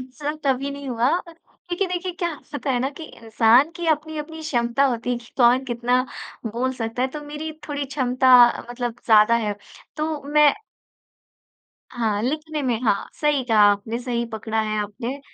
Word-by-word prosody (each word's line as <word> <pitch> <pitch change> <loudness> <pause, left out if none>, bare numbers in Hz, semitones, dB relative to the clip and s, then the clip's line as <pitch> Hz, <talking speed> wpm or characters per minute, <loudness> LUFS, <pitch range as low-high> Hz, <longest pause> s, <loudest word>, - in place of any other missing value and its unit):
इस 255 0 -12
तरह 295 +1 -2
कभी 270 +1 +1
नहीं 280 -1 -7
हुआ, 240 +1 +1 0.2
क्योंकि 350 +3 -6
देखिए, 360 0 -3
क्या 340 -2 -3
स - - -30
होता 285 -1 -2
है 250 - +1
ना 270 - -1
कि 320 - -7
इंसान 230 +3 +3
की 345 - -4
अपनी-अपनी 315 +1 -8
क्षमता 245 -2 +1
होती 235 +1 -3
है, - - -1
कि 235 0 -17
कौन 250 +1 +4
कितना 245 +1 +1 0.5
बोल 260 +2 -1
सकता 230 +1 -3
है? 260 - +1
तो 300 +3 -7
मेरी 300 +2 -6 0.2
थोड़ी 285 -1 -2
क्षमता 260 -1 +2 0.4
मतलब 240 -1 -4
ज़्यादा 220 0 +6
है। 205 - -1 0.4
तो 310 -1 -2
मैं 300 -1 +6 1.4
हाँ, 220 -4 -1
लिखने 305 +3 -2
में 245 -3 0
हाँ, 210 -4 +1
सही 295 -3 +2
कहा 220 -3 +3
आपने, 205 +3 -2
सही 240 -1 -2
पकड़ा 220 0 -2
है 215 0 -2
आपने। 230 +6 -4
255 Hz, 175 wpm, -23 LUFS, 235-295 Hz, 1.4 s, ज़्यादा